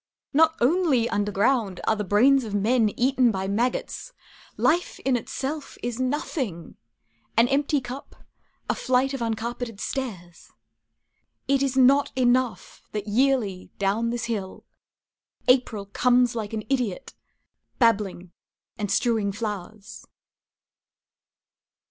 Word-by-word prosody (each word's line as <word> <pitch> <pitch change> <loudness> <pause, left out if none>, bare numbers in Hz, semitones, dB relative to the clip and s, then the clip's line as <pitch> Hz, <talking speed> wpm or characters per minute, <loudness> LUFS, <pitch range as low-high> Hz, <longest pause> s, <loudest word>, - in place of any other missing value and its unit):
Not 320 +2 +4
only 275 -3 +3
under 205 -1 -1
ground 205 -2 +1
are 220 - +2
the 210 - -3
brains 255 +7 +4
of 210 -3 -4
men 220 +2 +3
Eaten 255 0 +3
by 190 -3 -2
maggots. 230 +6 -2 0.4
Life 345 +3 +1
in 265 -1 +1
itself 275 +5 -4
Is 240 0 -3
nothing, 255 - -3 0.6
An 230 +1 +6
empty 285 +2 +2
cup, 255 +2 -9 0.5
a - - +1
flight 260 +2 +1
of 270 - -4
uncarpeted 230 0 -3
stairs. 190 -12 -5 1.0
It 275 0 +2
is 270 -1 0
not 275 +2 +5
enough 255 -1 0
that 210 -1 -4
yearly, 220 -5 +1
down 205 +4 0
this 235 0 -2
hill, 205 -5 -5 0.8
April 250 -5 +2
Comes 245 +4 +2
like 220 -2 -4
an 215 -1 -3
idiot, 250 -4 -2 0.6
babbling 205 -7 +1 0.5
and 205 -1 -2
strewing 215 0 +1
flowers. 210 0 -6
235 Hz, 120 wpm, -25 LUFS, 205-260 Hz, 1.0 s, An